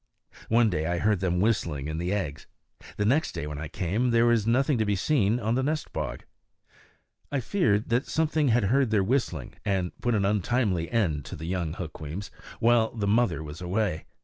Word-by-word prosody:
One 115 -1 +4
day 80 -2 -1
I 85 0 0
heard 105 +2 +2
them 90 -1 0
whistling 85 -9 0
in 80 +1 -3
the 90 +2 -2
eggs; 85 -8 -3 0.5
the 105 - 0
next 140 +9 +2
day, - - -4
when 75 -1 -5
I 80 - -4
came, 100 +11 -1
there 115 0 +4
was 115 -2 +3
nothing 130 +2 +2
to - - +3
be 105 -1 +1
seen 110 +1 +2
on 110 0 0
the 130 - +1
nest 150 +3 -2
bog. - - -4 1.1
I 140 - 0
feared 115 - +1
that 120 +3 +1
something 155 -2 +1
had 120 -2 +3
heard 130 +5 +2
their 105 -3 +2
whistling 95 - -1
and 95 -3 0
put 120 -1 +1
an 100 -2 +1
untimely 105 -3 +1
end 85 - 0
to - - -7
the 80 - -7
young 85 -3 -2
Hukweems 80 +2 -6 0.3
while 115 -1 +3
mother 105 -3 +2
bird 80 - -6
was 75 +3 -8
away. 90 -1 -1
105 Hz, 200 wpm, -27 LUFS, 85-120 Hz, 1.1 s, One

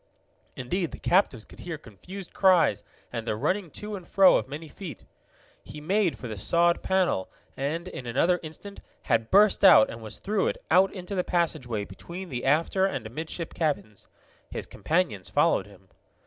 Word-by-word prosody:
Indeed 165 +7 -2
the - - -6
captives 170 - +1
could - - -16
hear 170 -3 -5
confused 170 - -11
cries 170 - +4 0.3
and 115 -1 -4
the 110 - 0
running 185 - -1
to 210 +7 -6
and 185 -3 -9
fro 195 -1 +6
of - - 0
many 150 +4 -7
feet. 155 - -9 0.6
He 150 - -9
made 185 +3 +1
for 125 - -7
the 110 -3 -6
sawed 170 - +2
panel, 185 - +1 0.3
and, 155 +6 -3
in 130 -9 -7
another 165 +9 +2
instant, 175 +6 -9 0.2
had 115 -2 +1
burst 205 +1 +5
out 110 - +8
and 115 - -9
was 110 -1 -8
through 205 -1 0
it, - - -4
out 185 +3 +5
into 185 +1 -7
the 185 -2 0
passageway 140 -13 -1
between 170 - -9
the 125 -2 -4
after 165 +7 +2
and 135 - -4
amidship 160 +8 -5
cabins. 145 - -3 0.4
His - - -5
companions 160 - -1
followed - - +2
him. 95 -2 -18
165 Hz, 175 wpm, -27 LUFS, 120-185 Hz, 0.6 s, out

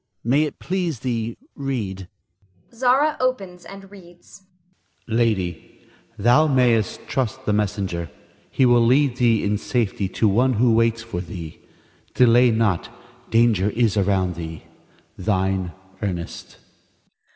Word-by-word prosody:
May 140 +6 +2
it 150 - -7
please 175 - -3
thee, 115 -2 -3 0.2
read. 110 - -4 0.7
Zara 260 +6 +2
[opens 195 -9 -2
and 195 0 -12
reads]. 175 -1 -16 0.7
Lady, 110 -6 -1 0.3
Thou 120 +9 +4
mayst 120 -7 +1
trust 130 0 -2
the 105 - +1
messenger. 100 -5 -2 0.4
He 130 - +2
will 120 -1 +5
lead 130 +1 +3
thee 115 -3 +2
in 105 0 0
safety 105 -5 -1
to 110 - +1
one 125 +6 +3
who 120 +1 +3
waits 115 0 +2
for 115 -7 -5
thee. 85 -2 -8 0.6
Delay 125 0 +5
not; 110 -6 0 0.4
danger 115 -4 +3
is 115 -1 +1
around 95 -2 +1
thee. 80 -1 -7 0.6
Thine, 95 -2 0 0.3
Ernest. 90 -5 -5
115 Hz, 120 wpm, -22 LUFS, 100-130 Hz, 0.7 s, will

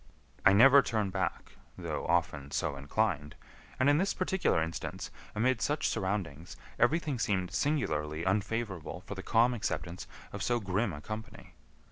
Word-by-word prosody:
I - - +7
never 135 +7 +8
turn 110 -6 -1
back, 95 -4 -2 0.3
though - - -4
often 75 -5 0
so 70 - -1
inclined, 75 +1 -1 0.4
and 130 - +3
in 145 +1 +5
this 195 +2 +1
particular 185 - +1
instance, 80 +1 -4 0.2
amid 120 +2 +2
such 150 +6 +1
surroundings, 90 -5 -3 0.2
everything 145 +1 +2
seemed 95 -6 0
singularly 80 - 0
unfavorable 95 -3 -2
for - - -5
the 95 - -6
calm 115 +4 +3
acceptance 90 -6 -3 0.3
of 100 - -5
so 120 +4 +1
grim 100 +1 0
a 75 -2 -7
company. 110 -1 -8
100 Hz, 145 wpm, -31 LUFS, 85-120 Hz, 0.4 s, never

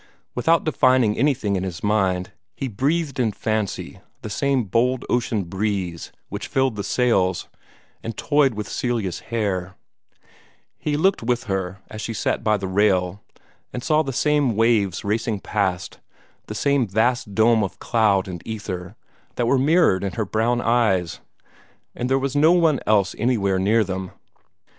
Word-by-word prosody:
Without 165 +7 +2
defining 130 -7 +3
anything 130 -8 +1
in 95 - -1
his 90 -2 -5
mind, 95 -4 +1 0.2
he 135 - -3
breathed 140 +6 -1
in 115 -3 +2
fancy 110 -1 -3 0.2
the 110 - -6
same 135 +3 +1
bold 120 +5 0
ocean 115 -4 0
breeze 95 -2 -3 0.2
which - - -6
filled 130 -3 +1
the 100 - -4
sails, 95 -8 +1 0.5
and 115 -1 -6
toyed 145 -5 +2
with 105 -1 -4
Celia's 115 -8 -2
hair; 100 -5 -3 1.0
he 145 -1 -1
looked 190 +5 +2
with 120 0 0
her 95 -1 -3
as 110 - -8
she 115 - -4
sat - - -1
by 110 -1 +2
the 95 -1 -4
rail, 95 -1 +1 0.5
and 125 - -5
saw 155 -1 +3
the 135 -3 -3
same 145 -2 +1
waves 105 -5 +2
racing 110 0 -1
past, 95 -4 -2 0.5
the 105 - -6
same 140 +1 +1
vast 110 +2 0
dome 110 0 +4
of 95 -2 -4
cloud 105 -5 +2
and 90 -3 -6
ether 100 -3 -6 0.4
that 120 - 0
were 130 +3 +3
mirrored 145 - +3
in 100 - -3
her 110 -3 -2
brown 115 +4 0
eyes, 110 -8 +1 0.7
and 125 - -3
there 135 - +3
was 135 +1 -2
no 155 +4 +5
one 165 -5 +3
else 100 -3 +3
anywhere 100 -5 +1
near 110 +4 +3
them. 95 -1 -4
110 Hz, 155 wpm, -22 LUFS, 95-125 Hz, 1.0 s, no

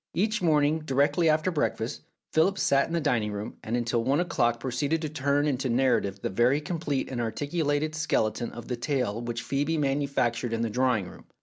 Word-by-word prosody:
Every 210 +1 +1
morning, 155 -1 +3
directly 150 +3 +2
after 155 +4 +2
breakfast, 130 -7 -2 0.3
Philip 190 +5 +3
sat 140 -6 +3
in 165 - -6
the 170 - +2
dining 115 -8 0
room, 105 +1 -6
and 115 +2 -1
until 120 -1 0
one 135 +5 +2
o'clock 120 -10 +1
proceeded 140 +5 -1
to 155 - -2
turn 145 0 +1
into 135 -3 0
narrative 115 -6 +1
the - - 0
very 120 +8 +3
complete 150 -3 -2
and 120 -2 -2
articulated 145 +5 -1
skeleton 120 -7 0
of 120 -1 -9
the 125 - -3
tale 120 -4 -1
which 120 0 -4
Phcebe 145 +4 0
manufactured 135 -5 0
in 115 0 0
the 115 - -1
drawing 125 -5 +1
room. - - -13
135 Hz, 190 wpm, -27 LUFS, 120-155 Hz, 0.3 s, morning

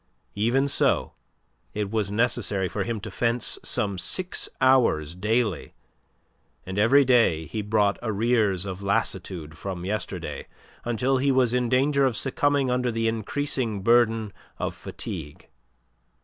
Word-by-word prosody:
Even 120 +7 +1
so, - - +2 0.6
it 105 -1 -2
was 110 -3 0
necessary 105 -3 +1
for - - -3
him 115 -2 -3
to - - -7
fence 115 -1 0
some 100 -6 -1
six 180 - -1
hours 115 - +3
daily, 105 0 -1 0.9
and 95 +2 -4
every 135 +7 +5
day 115 -11 +3
he 105 +8 -4
brought 105 -1 +1
arrears 110 -4 +1
of 95 0 -6
lassitude 95 -6 -2
from 90 0 -6
yesterday 105 +1 -4 0.4
until 120 +3 +1
he 140 +1 +2
was 130 -3 +2
in 125 -1 +1
danger 140 +3 +2
of 130 -4 +1
succumbing 140 -1 +1
under 125 0 0
the 115 0 -1
increasing 115 -1 -2
burden 115 -2 +3 0.2
of - - -3
fatigue. 75 0 -8
115 Hz, 135 wpm, -25 LUFS, 100-125 Hz, 0.9 s, every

